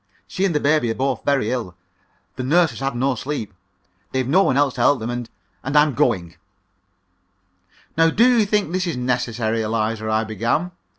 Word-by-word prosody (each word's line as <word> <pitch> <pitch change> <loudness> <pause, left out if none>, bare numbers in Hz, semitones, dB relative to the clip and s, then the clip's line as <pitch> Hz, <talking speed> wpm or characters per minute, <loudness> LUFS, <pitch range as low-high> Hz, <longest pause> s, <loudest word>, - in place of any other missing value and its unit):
She 195 0 -1
and 180 -5 0
the - - +3
baby 150 -4 +2
are 115 - -1
both 135 +1 -1
very 135 -6 +1
ill, 115 -8 -4 0.6
the 130 - -5
nurse 160 +5 +3
has - - -9
had 135 -1 -2
no 130 +2 +1
sleep, 125 -4 -5 0.6
they've 130 -1 0
no 175 +8 +4
one 135 -9 +2
else 140 -2 +2
to - - -4
help 145 - +4
them. 115 +2 -4
And 120 -1 -5 0.3
and 135 +3 0
I'm 150 -1 +4
going!" 90 -8 0 1.6
"Now, 165 +1 +4
do 230 +8 +4
you 210 - +2
think 205 -5 0
this 185 0 -1
is 165 -7 -2
necessary, 120 -2 -1
Eliza?" 110 0 -2
I 110 0 +1
began. 115 - -1
130 Hz, 190 wpm, -21 LUFS, 115-150 Hz, 1.6 s, no